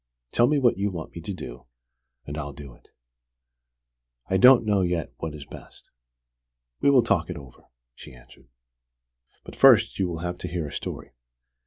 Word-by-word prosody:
Tell 120 - +3
me 150 +2 +2
what 120 -7 +2
you 100 +1 0
want 85 -4 -7
me 85 - -7
to 90 - -6
do, 60 -9 -9 0.6
and 75 - -7
I'll 70 -2 -5
do 70 -2 -11
it." - - -24 1.4
"I 95 - +3
don't 125 +2 +7
know 105 -2 +2
yet 85 -8 -2
what 80 -2 -6
is 75 -2 -10
best. - - -14 0.9
We - - +3
will 130 -4 +5
talk 95 -6 0
it 90 - -5
over," 65 -4 -14 0.3
she 65 - -13
answered. - - -19 1.0
"But - - -11
first - - +5
you 95 - +1
will 85 -2 -5
have 90 0 -4
to - - -5
hear 85 -3 -4
a 70 - -9
story. - - -6
85 Hz, 180 wpm, -25 LUFS, 75-100 Hz, 1.4 s, don't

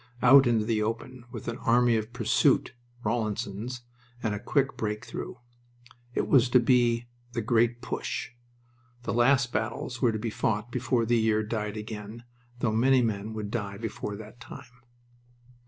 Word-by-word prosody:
Out 130 +1 +8
into 115 -3 +2
the 110 -1 +1
open, 115 +3 -4
with - - -8
an 120 +2 -3
Army 120 0 +3
of 110 +1 -2
Pursuit 125 - +2 0.3
(Rawlinson's) 110 +1 -2 0.4
and 110 -3 0
a 105 - -3
quick 135 +4 0
break 105 -1 -3
through. - - -6 0.8
It - - 0
was 125 -3 +5
to 125 - +6
be 120 -1 +3 0.3
"The 115 -2 -2
Great 120 +1 +2
Push." - - -3 0.7
The - - -2
last 120 0 +3
battles 115 +3 -3
were 120 - +4
to 110 - -2
be 110 +1 -3
fought 105 +2 -1
before 125 -1 0
the 120 +1 +3
year 110 -1 +2
died 105 -1 -3
again, 105 +1 -7 0.4
though 115 - +2
many 130 +3 +4
men 110 -1 -2
would 105 -1 -5
die 100 -4 -3
before 105 -1 -4
that 110 +3 -11
time. 125 0 -12
115 Hz, 160 wpm, -28 LUFS, 110-120 Hz, 0.8 s, Out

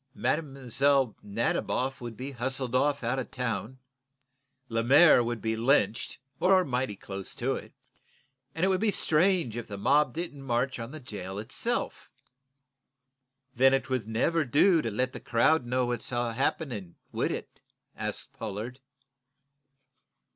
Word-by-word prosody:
Mlle. 135 -3 +1
Nadiboff 120 +5 -1
would 120 -3 -7
be 135 +2 -5
hustled 130 0 -3
off 140 +1 +2
out 120 +3 0
of 130 - -5
town, 125 0 -3 0.9
Lemaire 125 +5 +6
would 120 -2 -3
be 110 0 0
lynched, 115 0 +1 0.2
or 185 0 +4
mighty 125 -5 -1
close 95 0 -6
to - - 0
it, - - -7 0.8
and 165 +3 +1
it - - +2
would 190 0 +1
be 220 - +3
strange 170 - +2
if 120 - -5
the 100 - -6
mob 140 +5 +3
didn't 165 -4 -4
march 130 0 -1
on 115 0 -5
the 155 +3 -8
jail 100 -7 -7
itself." 105 +2 -2 1.4
"Then 135 +1 +5
it 135 - -3
would 125 -5 -1
never 155 +9 +1
do 155 +6 +4
to 115 - -2
let 130 +5 -1
the - - -6
crowd 120 +3 +2
know 125 +1 +1
all 120 - -1
that's 120 -2 -3
happening, 120 - -2 0.2
would - - -1
it?" - - -6 0.4
asked - - -4
Pollard. 110 +4 -6
125 Hz, 145 wpm, -28 LUFS, 115-140 Hz, 1.4 s, Lemaire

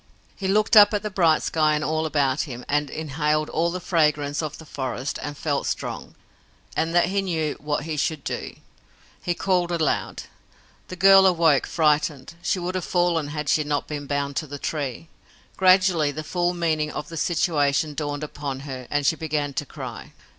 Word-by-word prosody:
He 195 - -4
looked 215 +4 +2
up 210 0 +8
at 205 - -2
the 210 - -3
bright 165 -5 +3
sky 155 -1 +2
and 150 - -2
all 155 +1 0
about 140 -2 +1
him, 125 -1 -7
and 145 0 0
inhaled 155 0 -1
all 170 +2 +1
the 180 +2 -4
fragrance 150 -5 +1
of 150 -2 -5
the 160 - -12
forest, 130 -2 -4
and 145 -1 -6
felt 145 -3 -1
strong, - - -4 0.6
and 165 +1 -1
that 175 0 +4
he 200 +1 +1
knew 160 -5 -1
what 150 0 -2
he 155 -1 -4
should 150 0 -1
do. - - -5 0.7
He 175 - -1
called 180 -2 +1
aloud. 160 -4 -1 0.6
The 185 - -7
girl 195 +1 +7
awoke, 165 -6 +3
frightened. 150 -3 +1
She 175 - 0
would 180 +1 -3
have 185 -1 -2
fallen 175 -4 +1
had 150 0 -5
she 155 - +3
not 145 -1 -1
been 145 -2 -5
bound 140 0 -2
to 155 - -2
the 145 +1 -6
tree. 145 0 -4 0.5
Gradually, 185 -4 +4
the 155 +2 -5
full 175 +2 -1
meaning 155 -3 0
of 150 - -6
the 165 - -8
situation 155 -3 +1
dawned 145 0 -3
upon 145 -3 -5
her 130 -3 -7
and 145 -1 0
she 160 - +3
began 150 -3 -2
to 145 - -3
cry. - - -8
155 Hz, 190 wpm, -24 LUFS, 145-175 Hz, 0.7 s, up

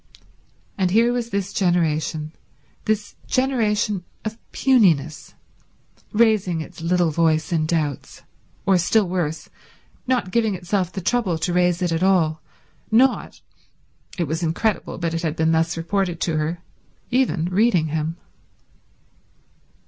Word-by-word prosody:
And 185 -1 +2
here 230 +5 +3
was 240 -1 -2
this 200 -1 -3
generation, 160 -4 0 0.5
this 215 -1 -1
generation 210 -7 +1 0.2
of 220 +1 -4
puniness, 170 - +2 0.8
raising 210 -6 +2
its 165 +1 -8
little 175 0 +2
voice 160 +1 +1
in 155 -2 +1
doubts, 155 -4 -2 0.4
or, 190 -2 +4
still 195 +4 +2
worse, 170 -3 -2 0.6
not 245 -8 0
giving 220 -3 +1
itself 180 0 -1
the 190 - -5
trouble 195 -4 0
to 175 +2 -2
raise 180 0 +2
it 175 - 0
at 165 0 0
all, 165 -5 +2 0.5
not—it 230 -6 -2
was 160 +2 -3
incredible, 175 +5 -1
but 165 -1 -2
it 165 - -2
had 160 -2 -2
been 160 0 +2
thus 165 +1 +1
reported 175 0 -1
to 165 -3 0
her—even 170 +5 -2
reading 185 -4 +2
him. 160 +2 -2
180 Hz, 125 wpm, -22 LUFS, 160-210 Hz, 0.8 s, or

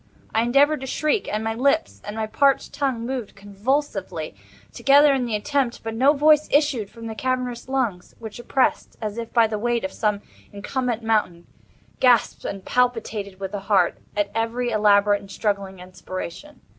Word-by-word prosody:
I 220 - +3
endeavored 275 +5 +3
to 265 - -5
shriek; 305 - 0
and 215 +1 -2
my 225 0 -1
lips 280 +7 0
and 205 - -6
my 220 0 -1
parched 275 +5 +1
tongue 265 -5 -1
moved 250 -4 -4
convulsively 200 - -3 0.4
together 285 +1 +5
in 260 -2 0
the 230 -3 -2
attempt—but 235 -1 -1
no 265 +6 +4
voice 305 +1 +4
issued 280 -8 +2
from 230 0 -11
the 225 - -4
cavernous 250 0 -3
lungs, 235 -10 -2
which 220 0 -9
oppressed 255 +2 0
as 215 0 -4
if 230 -1 -6
by 230 -2 +5
the 215 -1 -3
weight 240 +1 0
of 190 - -3
some 210 -2 -1 0.3
incumbent 235 +3 -3
mountain, 210 -6 0 0.5
gasped 245 -4 +3
and 195 -1 -5
palpitated, 225 -6 -1
with 195 -1 -5
the 205 - -3
heart, 195 -3 +1 0.2
at 205 -1 0
every 230 +2 -1
elaborate 205 -1 +4
and 195 - -14
struggling 200 -2 -2
inspiration. 185 - -8
225 Hz, 170 wpm, -23 LUFS, 205-260 Hz, 0.5 s, together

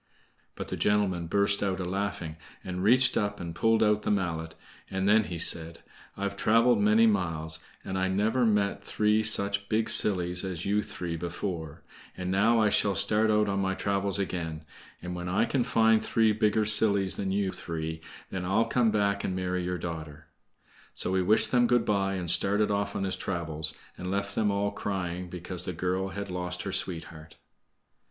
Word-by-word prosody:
But - - -7
the - - -4
gentleman 95 -5 0
burst 100 +3 +1
out 95 -2 -1
a 90 - -3
laughing, 90 -4 -4 0.3
and 90 0 -5
reached 125 +6 +4
up 100 -1 -1
and 85 -1 -6
pulled 115 +6 +2
out 105 -1 +2
the - - -3
mallet, 85 -5 -2 0.3
and 95 0 -2
then 105 +1 +4
he 85 - -5
said: 85 0 -2 0.3
"I've 100 0 -3
traveled 115 +1 +3
many 105 +2 +4
miles, 80 -7 +2 0.3
and 95 0 -3
I 95 - +1
never 105 +6 +1
met 100 -2 +1
three 105 +1 +1
such 100 -2 +2
big 110 +1 0
sillies 90 -5 +3
as 90 -3 -5
you 105 +1 +1
three 85 -4 -5
before; 85 -2 -5 0.3
and 90 0 -3
now 110 +5 +3
I 110 -1 +3
shall 100 -1 +1
start 105 +3 +3
out 105 0 +2
on 100 0 -1
my 95 0 -1
travels 100 0 -1
again, 80 -5 -4 0.4
and 90 0 -5
when 90 0 -5
I 100 +5 +2
can 130 -1 0
find 110 -1 +3
three 110 -1 +2
bigger 105 0 +1
sillies 100 -3 +4
than 95 - -2
you 100 -1 0
three, 80 -2 -6 0.3
then 95 -2 -4
I'll 100 +5 +1
come 115 0 +1
back 100 -1 0
and 95 - -2
marry 90 -1 -2
your 90 0 -2
daughter." 80 -3 -7 0.7
So 95 - 0
he 95 - +2
wished 105 +4 +3
them 120 -1 +3
good 120 -1 +2
by 95 -2 0
and 90 -3 +2
started 105 +3 +3
off 100 0 -2
on - - -2
his 95 -1 -1
travels, 80 -4 -3 0.2
and 90 - -5
left 100 +1 -2
them 105 -1 +1
all 100 0 -1
crying 90 -3 -4
because 90 0 -4
the 90 - -4
girl 90 +3 -2
had 100 0 -6
lost 90 0 -3
her 95 - -4
sweetheart. 80 -4 -4
95 Hz, 190 wpm, -28 LUFS, 90-105 Hz, 0.7 s, reached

